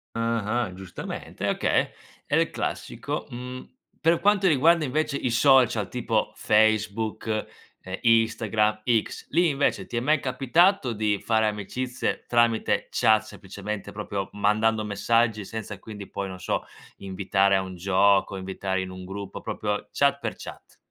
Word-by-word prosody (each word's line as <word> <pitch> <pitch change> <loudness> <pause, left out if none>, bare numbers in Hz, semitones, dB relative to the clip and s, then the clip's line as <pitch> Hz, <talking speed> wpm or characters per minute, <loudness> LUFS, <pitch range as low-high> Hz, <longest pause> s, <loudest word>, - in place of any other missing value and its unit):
Ah-ah, 115 -2 -1
giustamente 95 -1 -7
e - - +1
okay: - - +1 0.4
è - - 0
il - - +3
classico. - - -4
Mhmm, 125 - -8 0.2
per 165 +1 +3
quanto 200 -1 +3
riguarda 160 +1 +4
invece 140 +1 -1
i 125 - -1
social 120 -4 +4
tipo 115 -3 -1
Facebook, 110 0 +1 0.5
ehm, 95 +1 -6
Instagram, 110 -2 +2 0.2
X, - - -10
lì 170 +2 +3
invece 140 0 0
ti - - -8
è - - +3
mai 150 +5 +2
capitato 135 - +2
di 105 -1 0
fare 110 -1 +2
amicizie 120 +5 -3
tramite 120 -2 +2
chat 110 0 +4
semplicemente 100 0 -7
proprio 100 -2 -4
mandando 110 +2 +2
messaggi 110 +1 +1
senza 110 +1 -6
quindi 105 -3 -9
poi 100 -1 -4
non 95 - -8
so, 90 - -2 0.3
invitare 95 0 +1
a 95 - +2
un 95 -1 -7
gioco, 95 +2 +3
invitare 95 0 -3
in 95 - -5
un 95 0 -9
gruppo, 100 0 -7
proprio 105 0 -3
chat 140 0 +2
per - - -3
chat? - - -11
110 Hz, 145 wpm, -25 LUFS, 100-125 Hz, 0.5 s, riguarda